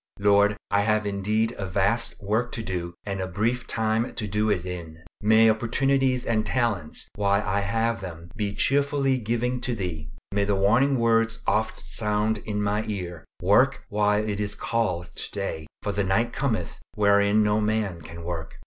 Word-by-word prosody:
Lord! 100 0 +4
I 100 - +4
have 105 0 +1
indeed 105 +3 0
a 95 - -3
vast 100 +5 +1
work 110 +5 0
to 115 - -3
do 85 -3 -4
and 100 -2 -3
a 95 - -2
brief 115 +6 -1
time 110 +1 0
to 105 - -2
do 105 +2 0
it 90 -4 0
in. 85 -3 -7 0.2
May 110 +2 +6
opportunities 130 +3 +2
and 110 -2 +1
talents, 110 -9 -1
while 100 0 +1
I 95 +2 +1
have 115 +2 0
them, 85 -2 -8
be 100 -2 -2
cheerfully 140 -1 +2
given 120 +2 -1
to 125 -1 -1
Thee. 85 -6 -4 0.2
May 100 0 +1
the 100 0 +1
warning 120 +8 +3
words 115 -1 +2
oft 110 0 0
sound 105 0 0
in 105 0 -3
my 105 +1 0
ear, 90 -7 -5 0.2
"Work - - +4
while 105 +1 +1
it 105 -1 -2
is 100 -1 -2
called 95 -7 -1
today, 90 -6 -4 0.2
for 105 - -1
the 100 0 0
night 115 +5 +1
cometh 110 - -2 0.2
wherein 100 +1 +4
no 105 +1 +2
man 105 -5 -1
can 85 +2 -9
work." 85 -2 -5
105 Hz, 175 wpm, -25 LUFS, 100-115 Hz, 0.2 s, May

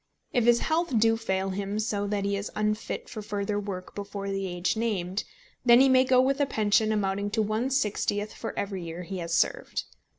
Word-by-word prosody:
If 245 -3 +2
his 240 0 +5
health 320 -5 +1
do 225 +1 +4
fail 190 -4 -1
him 200 +2 -3
so 210 -2 -1
that 200 -1 -1
he 200 0 0
is 200 +1 -3
unfit 215 0 -2
for 215 - -6
further 205 0 -2
work 195 -3 -6
before 200 -1 -5
the 195 0 -2
age 175 +2 -1
named, 205 -4 -1 0.4
then 240 -1 +7
he 270 +1 +6
may 260 0 +5
go 255 0 +4
with 270 +2 +2
a 285 - +3
pension 215 -1 +2
amounting 200 -1 0
to 220 +2 0
one 215 +5 -1
sixtieth 210 -4 0
for - - -5
every 195 -3 -3
year 170 +2 -6
he 190 +1 -5
has 170 -1 -5
served. - - 0
205 Hz, 205 wpm, -27 LUFS, 195-230 Hz, 0.4 s, then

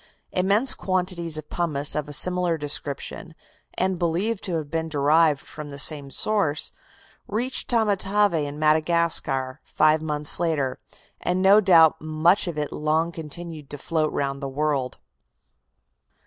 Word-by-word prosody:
Immense 200 +8 +3
quantities 180 -4 -1
of 155 -1 -8
pumice 150 -5 +1
of 150 0 -2
a - - -8
similar 180 +2 +1
description, 145 +3 -4 0.4
and 185 -1 -1
believed 185 +6 -1
to 180 - -2
have 155 -3 -5
been 165 0 -2
derived 150 0 +2
from 150 -1 -9
the 140 - -8
same 145 -1 +1
source, 160 -3 -1 0.6
reached 240 +5 -1
Tamatave 205 -3 +1
in 145 -2 -3
Madagascar 155 -4 +1
five 155 0 +2
months 150 -1 +3
later, 155 -7 -1 0.4
and 180 +1 -1
no 195 +2 +6
doubt 165 -5 +5
much 155 +5 +2
of 170 -3 -5
it 150 -1 -3
long 160 +2 0
continued 160 -1 -8
to 145 - -7
float 155 +1 -1
round 140 0 -3
the 135 - -4
world. 140 -2 -2
160 Hz, 140 wpm, -23 LUFS, 150-180 Hz, 0.6 s, no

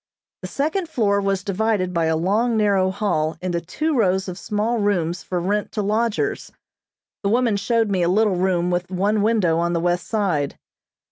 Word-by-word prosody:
The - - -5
second 320 +5 -2
floor 200 -7 +1
was 195 -1 -1
divided 200 -2 0
by 165 -2 +1
a 160 0 +1
long 220 +7 +1
narrow 200 -3 +2
hall 170 -5 -1
into 175 -1 -2
two 305 - -2
rows 190 -5 +1
of 180 0 -6
small 215 +4 -1
rooms 180 -4 0
for 180 - -3
rent 205 +4 -1
to 210 - -1
lodgers. 230 - -1 0.7
The 200 - 0
woman 235 -1 +2
showed 220 +1 +1
me 185 -2 +1
a 170 - +2
little 210 +1 +3
room 180 -1 +1
with 175 0 -1
one 200 +3 +1
window 200 -7 +2
on 170 0 0
the 170 - +1
west 175 0 0
side. 180 -10 -1
195 Hz, 185 wpm, -22 LUFS, 175-220 Hz, 0.7 s, little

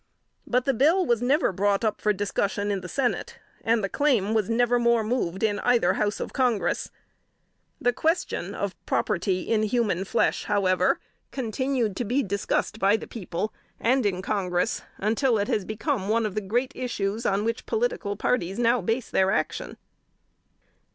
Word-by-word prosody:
But 250 0 +1
the 275 - +2
bill 320 +10 +3
was 235 -4 +1
never 275 - +2
brought 200 +3 +1
up 215 - -1
for 210 - +3
discussion 205 0 -1
in 195 -2 -1
the 180 - -8
Senate, 255 +2 -1 0.3
and 225 -1 +2
the - - +1
claim 230 -5 +1
was 220 -2 +1
never 240 +1 +3
more 235 -1 +3
moved 215 -5 -1
in 210 -1 +1
either 245 -1 +3
House 210 -1 -1
of - - -5
Congress. 235 -9 0 0.9
The 245 - +2
question 315 - -1
of 200 -2 -2
property 185 -2 0
in 220 -2 +1
human 215 -4 +1
flesh, - - +1
however, 185 -3 +2 0.3
continued 250 -3 -1
to - - -1
be 250 +5 +1
discussed 200 +2 -1
by 200 +2 +4
the - - -8
people, 205 -1 -4 0.3
and 255 +2 +2
in 190 -2 -1
Congress, 185 -1 0 0.2
until 225 +4 +1
it 205 0 0
has 205 - 0
become 215 -1 -2
one 225 +1 +2
of 210 - -2
the 215 - -1
great 240 +7 -1
issues 225 -3 -2
on 200 +2 +1
which 230 +1 -2
political 450 - -1
parties 200 -3 -1
now 240 0 +3
base 225 +6 -2
their 190 0 +3
action. 195 - -2
220 Hz, 170 wpm, -26 LUFS, 200-245 Hz, 0.9 s, by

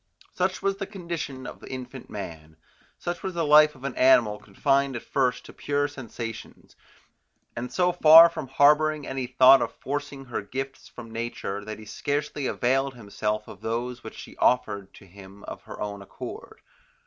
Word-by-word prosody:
Such 185 +1 -1
was 195 0 0
the 195 -1 -4
condition 170 -9 -6
of - - -9
infant 130 0 -8
man; 80 -5 -8 0.4
such 175 0 -4
was 190 -2 -4
the 165 -2 0
life 150 0 +6
of 130 - -16
an 140 -2 -3
animal 120 -5 +4
confined 135 +5 0
at 120 - -5
first 130 -3 0
to - - -12
pure 145 0 -1
sensations, 115 -5 -8 0.8
and 120 +1 -5
so 180 -1 +2
far 165 -1 +9
from 165 -4 -6
harbouring 150 +2 +3
any 135 -1 -3
thought 130 +1 +7
of 120 - -3
forcing 145 0 -5
her 125 - -4
gifts 135 +6 -6
from 115 -2 -11
nature, 115 -3 -4
that 110 0 -6
he 110 - -12
scarcely 145 +4 -3
availed 135 +2 0
himself 105 -1 -3
of - - -12
those 120 +2 -3
which - - -9
she - - -10
offered 100 -6 +1
to - - -15
him 95 +2 -14
of - - -8
her - - -10
own 100 -1 -5
accord. 100 - -9
130 Hz, 170 wpm, -26 LUFS, 110-145 Hz, 0.8 s, far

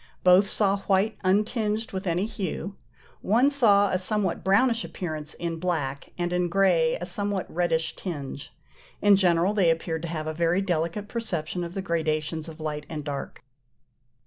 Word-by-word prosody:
Both 185 +2 +6
saw 200 -1 +2
white 200 +3 +2
untinged 210 +3 0
with 190 0 -4
any 175 +3 +1
hue. 200 -2 -4 0.5
One 240 +8 +3
saw 205 -8 +4
a 185 - +1
somewhat 190 -2 0
brownish 230 +5 +3
appearance 155 -4 -5
in 165 -1 -4
black, 150 -6 -2
and 175 0 -1
in 180 0 +1
grey 170 -4 +3
a 175 - -4
somewhat 200 +1 -2
reddish 165 -1 0
tinge. 145 -6 -6 0.5
In 205 -1 +6
general 180 0 +3
they 195 -5 +3
appeared 165 0 -1
to 170 - -4
have 155 -2 -4
a 155 - -3
very 170 +3 +1
delicate 175 +3 -2
perception 180 -7 -3
of 170 +2 -7
the 195 - -3
gradations 160 -2 -1
of 160 0 -11
light 150 -1 -4
and 155 -2 -5
dark. 140 -3 -6
180 Hz, 165 wpm, -26 LUFS, 160-200 Hz, 0.5 s, Both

